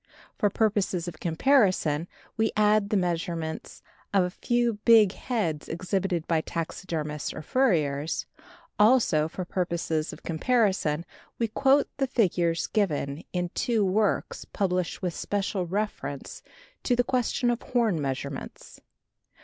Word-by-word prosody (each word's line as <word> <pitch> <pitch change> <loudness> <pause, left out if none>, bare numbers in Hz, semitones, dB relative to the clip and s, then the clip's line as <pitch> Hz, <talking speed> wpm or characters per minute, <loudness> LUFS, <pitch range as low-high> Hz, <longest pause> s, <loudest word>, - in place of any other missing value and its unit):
For 205 - +2
purposes 195 -4 0
of 160 -2 -7
comparison 175 - +2 0.3
we 220 0 +1
add 210 -1 +3
the 215 - +2
measurements 170 -3 -3 0.3
of 195 -2 +4
a 180 - -1
few 240 +1 0
big 220 -4 +7
heads 200 - -3
exhibited 185 -1 -1
by 165 -2 +2
taxidermists 160 -2 -4
or 155 - -6
furriers; 155 - +1 0.5
also 210 -9 +4
for 180 +3 -6
purposes 170 -3 -1
of - - -12
comparison 175 -4 +1 0.3
we 230 - 0
quote 275 +5 +3
the 270 -1 +1
figures 175 -8 +1
given 150 -8 -1
in 180 -1 -1
two 220 +2 0
works 205 +2 0
published 185 -1 -2
with 180 -2 -1
special 195 -1 -2
reference 190 -7 -4 0.4
to 245 - +1
the 245 - +3
question 245 0 +1
of 240 - -2
horn 225 -10 +1
measurements. 140 0 -5
185 Hz, 125 wpm, -27 LUFS, 165-220 Hz, 0.5 s, big